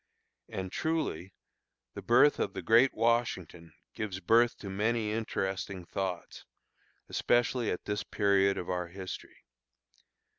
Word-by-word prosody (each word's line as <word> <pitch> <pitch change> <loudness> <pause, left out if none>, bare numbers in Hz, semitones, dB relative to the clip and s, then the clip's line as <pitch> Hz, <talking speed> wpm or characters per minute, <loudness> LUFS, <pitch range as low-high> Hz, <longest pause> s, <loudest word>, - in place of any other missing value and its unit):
And 95 -1 -5
truly, 155 - -2 0.6
the - - -7
birth 125 +5 +4
of - - -1
the - - -6
great 120 +4 +5
Washington 110 -8 0 0.2
gives 100 -4 -4
birth 115 +3 +3
to 100 - -9
many 105 +3 0
interesting 95 -4 -3
thoughts, 95 -1 -4 0.6
especially 120 -1 +1
at 90 - -3
this 105 - -2
period 100 -1 +2
of 90 - -4
our 90 -1 -2
history. 95 +1 -9
100 Hz, 120 wpm, -30 LUFS, 95-115 Hz, 0.6 s, great